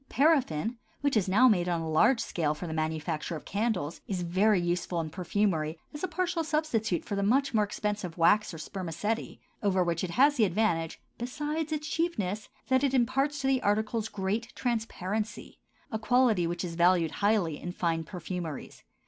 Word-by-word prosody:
Paraffin, 245 - +2 0.2
which 285 -2 +1
is 195 -4 +2
now 235 +7 +6
made 180 -6 +3
on 170 -1 +1
a 165 - -4
large 160 +11 +4
scale 155 -9 -1
for 165 - -6
the 160 - -4
manufacture 160 +1 -2
of 155 - -8
candles, 200 -7 -1
is 185 -3 -2
very 190 +4 +3
useful 175 0 -1
in 160 -2 -3
perfumery 175 -3 0 0.2
as 295 - -7
a - - +1
partial 345 -1 -1
substitute 270 - 0
for 200 - -3
the 200 - 0
much 260 +8 +2
more 215 -2 +4
expensive 205 -4 -3
wax 205 +5 +4
or 165 - -8
spermaceti, 190 +6 -4 0.2
over 190 -3 +2
which 170 0 -1
it 185 - -2
has 280 - +4
the 230 - +4
advantage, 175 -4 +1 0.2
besides 295 +6 -3
its 300 -1 -2
cheapness, 215 - -2 0.2
that 260 +1 +3
it 270 -1 +2
imparts 270 +4 +1
to - - -4
the 265 -1 +2
articles 215 +1 0
great 210 +4 -2
transparency—a 220 -1 -4
quality 225 -6 +3
which 175 +1 -3
is 170 - -5
valued 170 -1 +3
highly 200 -7 +2
in 175 - -4
fine 165 -2 -1
perfumeries. 175 -2 -6
205 Hz, 175 wpm, -29 LUFS, 175-245 Hz, 0.2 s, now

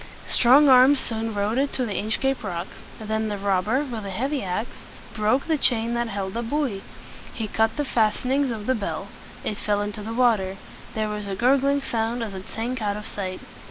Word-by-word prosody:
Strong 265 +5 +6
arms 260 +2 +7
soon 225 0 -3
rowed 205 +4 0
it 280 +1 +1
to 255 - 0
the 210 - -3
Inchcape 260 +5 0
Rock. 175 -3 -3 0.3
Then 220 0 -1
the 205 -1 -3
robber, 200 +7 +1
with 235 -5 -5
a 200 - -5
heavy 265 +8 -1
ax, 190 +5 -2 0.5
broke 220 +5 +1
the 315 -2 +1
chain 235 -2 +2
that 235 0 0
held 195 -3 -4
the 235 - -2
buoy. 240 -4 -1 0.5
He 225 -2 -3
cut 220 +3 +1
the 295 - 0
fas 220 -5 +1
ten 255 - -1
ings 275 0 +2
of 220 -3 -4
the 260 - +2
bell. 200 -4 -4 0.3
It 210 - -2
fell 205 -1 0
into 205 0 -5
the 225 +2 -5
water. 215 -6 +2 0.4
There 215 -1 0
was 210 -1 -4
a 195 - -3
gur 255 +6 +4
gling 280 +1 +1
sound 230 0 -1
as 215 -3 -5
it 190 0 -8
sank 240 +2 -3
out 205 -1 -1
of 210 - -7
sight. 185 -2 -4
225 Hz, 215 wpm, -24 LUFS, 205-255 Hz, 0.5 s, arms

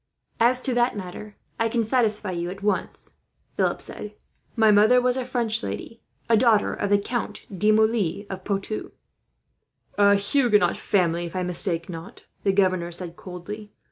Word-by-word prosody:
"As 250 +2 +3
to 260 - -1
that 240 -2 +1
matter, 200 +2 -8 0.2
I 230 0 +1
can 230 0 0
satisfy 215 -4 0
you 175 0 -3
at 195 +2 -8
once," 205 - -2 0.4
Philip - - 0
said. 210 0 -6 0.4
"My 220 -2 +5
mother 215 +4 +5
was 250 0 +2
a 260 - -1
French 235 -2 -1
lady, 230 - -6 0.3
a 230 - +4
daughter 220 -2 +3
of 205 - -2
the 205 - +5
Count 215 0 -4
de 210 +4 +3
Moulins 215 -3 +1
of 190 -1 -7
Poitou." 200 +2 -3 1.1
"A 200 0 +6
Huguenot 210 +1 +3
family, 175 -4 0
if 170 - -11
I 185 - -1
mistake 175 -1 +1
not," 175 +5 -9 0.2
the 195 - +3
governor 185 -3 +1
said, 170 0 -6
coldly. 205 +4 -9
210 Hz, 165 wpm, -24 LUFS, 185-230 Hz, 1.1 s, A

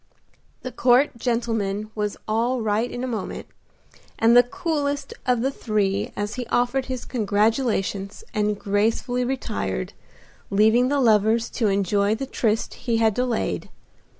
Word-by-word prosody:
The 255 - -5
court 250 +3 +3
gentleman 220 -4 -1
was 210 -1 -2
all 235 +4 +1
right 220 +2 0
in 245 - -5
a - - -1
moment, 230 -4 -4 0.7
and 230 +1 +4
the 245 - +10
coolest 285 -1 -2
of 250 -2 +2
the 265 +3 +1
three 205 -5 -1
as 205 +2 -3
he 245 -1 -5
offered 245 +2 +1
his 255 -2 -5
congratulations 210 - 0
and 210 -2 0
gracefully 225 +5 0
retired, 220 - -3 0.6
leaving 220 +5 +4
the 285 +1 +1
lovers 225 -1 +3
to 225 - 0
enjoy 200 +1 +1
the 270 - -4
tryst 225 -4 -1 0.2
he 230 - +3
had 225 -1 +3
delayed. 245 0 -1
230 Hz, 140 wpm, -23 LUFS, 210-250 Hz, 0.7 s, the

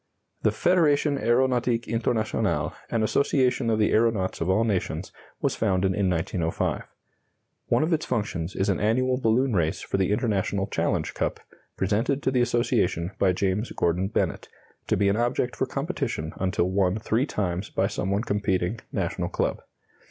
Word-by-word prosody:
The 110 - +3
Federation 150 - +2
Aeronautique 120 -1 +1
Internationale, 115 -1 0 0.2
an 115 -2 0
association 125 0 +2
of 110 - +2
the 105 - +2
aeronauts 110 -6 +1
of 80 - 0
all 105 +4 +3
nations, 95 -5 -2 0.3
was - - +1
founded 95 -3 +1
in 100 -2 +1
1905. 80 -1 -1 0.8
One - - +2
of 165 +2 +1
its 155 - -1
functions 95 -5 -2
is 95 - 0
an 100 -3 +1
annual 125 +5 +1
balloon 120 +3 +2
race 80 -5 0
for - - -2
the 95 0 +1
International 100 -3 0
Challenge - - -1
Cup, - - -2 0.4
presented 115 +9 0
to 130 - +1
the 125 -2 +2
association 115 -8 +1
by 95 - +4
James 95 +4 -1
Gordon 85 +3 +1
Bennett, - - -2 0.4
to - - +1
be 100 +1 +2
an 100 +2 +2
object 120 +1 0
for 130 - -1
competition 140 - -3
until 95 -1 0
won 95 0 +2
three 115 +5 0
times 95 -3 -2
by - - 0
some - - -2
one 100 +2 0
competing 100 -1 -1
national - - -2
club. - - -1
105 Hz, 160 wpm, -26 LUFS, 95-120 Hz, 0.8 s, by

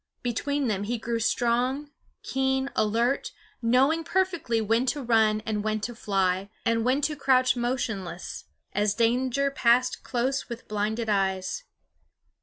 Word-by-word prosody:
Between 275 +3 -1
them 205 -2 -1
he 240 +3 -1
grew 230 +1 -2
strong, 245 +5 0 0.3
keen, 265 0 0
alert, 230 +5 +1 0.3
knowing 265 +8 +3
perfectly 345 -11 0
when 225 +4 +1
to 285 +2 -1
run 220 -2 +3
and 210 -2 -1
when 215 0 0
to 240 - -3
fly 195 -3 0 0.2
and 230 -1 +2
when 260 +4 +2
to 300 +1 0
crouch 260 -2 +3
motionless, 225 -8 -3 0.3
as 205 0 +1
danger 255 +4 +1
passed 250 -1 +2
close 260 +2 -1
with 235 +1 -7
blinded 215 +2 -1
eyes. 195 - 0
235 Hz, 135 wpm, -27 LUFS, 215-265 Hz, 0.3 s, knowing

